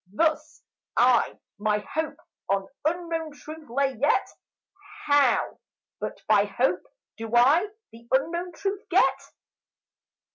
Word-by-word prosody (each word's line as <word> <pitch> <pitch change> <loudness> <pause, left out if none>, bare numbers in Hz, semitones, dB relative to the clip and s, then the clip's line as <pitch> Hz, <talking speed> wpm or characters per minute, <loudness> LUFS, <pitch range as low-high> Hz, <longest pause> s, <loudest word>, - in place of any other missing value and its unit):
Thus 315 +8 0 0.3
I 245 -1 +4 0.2
my 210 0 0
hope 310 -1 -2 0.3
on 195 0 +1 0.2
unknown 330 -1 -2
truth 310 -1 -11
lay; 270 +2 +1
yet 290 - +3 0.8
How 285 -4 +3 0.4
but - - -6
by 205 -1 +5
hope 205 -1 0 0.4
do 225 +1 -4
I 285 +11 +5 0.2
the 230 +1 -15
unknown 340 +6 0
truth 395 +2 -3
get? - - +4
280 Hz, 110 wpm, -26 LUFS, 230-320 Hz, 0.8 s, by